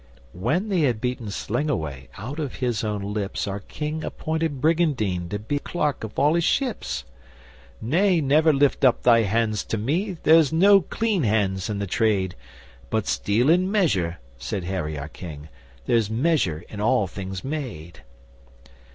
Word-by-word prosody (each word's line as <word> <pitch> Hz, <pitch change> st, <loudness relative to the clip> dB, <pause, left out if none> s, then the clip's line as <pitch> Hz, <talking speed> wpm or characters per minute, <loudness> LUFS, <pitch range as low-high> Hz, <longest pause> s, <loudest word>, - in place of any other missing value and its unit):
When 150 Hz, -, -1 dB
they 190 Hz, -3 st, +1 dB
had 125 Hz, -8 st, +2 dB
beaten 125 Hz, -1 st, -3 dB
Slingawai, 100 Hz, -, -3 dB
out 125 Hz, -, -6 dB
of 145 Hz, -5 st, -3 dB
his 120 Hz, -4 st, -1 dB
own 105 Hz, -1 st, -3 dB
lips, 105 Hz, -1 st, -3 dB
Our 100 Hz, 0 st, -3 dB
King 150 Hz, +9 st, -5 dB
appointed 160 Hz, -3 st, -2 dB
Brygandyne 130 Hz, -, +1 dB
to 105 Hz, -, -2 dB
be 110 Hz, +8 st, -2 dB
Clerk 150 Hz, -5 st, -2 dB
of 110 Hz, -1 st, -7 dB
all 150 Hz, +2 st, +4 dB
his 170 Hz, 0 st, +2 dB
ships. 240 Hz, -, -1 dB, 0.8 s
'Nay, 175 Hz, -, +2 dB
never 155 Hz, +2 st, +4 dB
lift 140 Hz, -1 st, +2 dB
up 130 Hz, -3 st, +4 dB
thy 120 Hz, -2 st, +6 dB
hands 110 Hz, 0 st, +1 dB
to 110 Hz, -, -2 dB
me 170 Hz, -, -1 dB
there's 160 Hz, -1 st, +6 dB
no 195 Hz, +5 st, +6 dB
clean 215 Hz, +2 st, -1 dB
hands 100 Hz, -4 st, 0 dB
in 105 Hz, -, -2 dB
the 100 Hz, -, -2 dB
trade. 95 Hz, -2 st, +1 dB, 0.6 s
But 110 Hz, -2 st, 0 dB
steal 110 Hz, +6 st, +1 dB
in 180 Hz, +4 st, +4 dB
measure,' 95 Hz, -, +1 dB, 0.2 s
said 90 Hz, +8 st, -4 dB
Harry 85 Hz, -5 st, -3 dB
our 70 Hz, +1 st, -5 dB
King. 80 Hz, -2 st, -9 dB, 0.4 s
'There's 115 Hz, -4 st, +2 dB
measure 110 Hz, -, +1 dB
in 105 Hz, -, -7 dB
all 105 Hz, -1 st, +3 dB
things 95 Hz, 0 st, -6 dB
made! 125 Hz, -, -6 dB
115 Hz, 160 wpm, -24 LUFS, 100-155 Hz, 0.8 s, thy